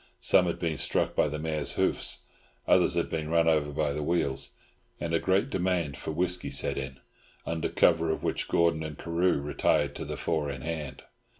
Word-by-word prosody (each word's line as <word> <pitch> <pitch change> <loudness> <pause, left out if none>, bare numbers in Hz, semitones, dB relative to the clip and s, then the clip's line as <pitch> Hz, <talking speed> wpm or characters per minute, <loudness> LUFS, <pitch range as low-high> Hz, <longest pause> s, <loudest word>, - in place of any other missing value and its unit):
Some 90 -1 +4
had 85 - -1
been 80 -4 -2
struck - - 0
by - - +3
the 75 +1 -3
mare's 75 -1 0
hoofs; - - 0 0.5
others - - +4
had - - +1
been 80 -1 -3
run 85 0 +3
over 75 -2 +2
by 75 0 0
the 75 - -3
wheels; 75 -4 -1 0.5
and 85 -1 -3
a 85 - +3
great 95 +10 +1
demand 90 -6 0
for - - -7
whisky 90 +1 -1
set 70 - +1
in, 65 -1 -5 0.5
under 80 -1 -2
cover 80 -1 +3
of 80 - -2
which - - -1
Gordon 85 -1 +2
and 80 -2 -6
Carew 85 -1 +1
retired 70 0 +1
to - - -5
the - - -5
four 80 -3 -1
in 65 -2 -5
hand. 80 -4 -5
80 Hz, 195 wpm, -28 LUFS, 75-85 Hz, 0.5 s, Some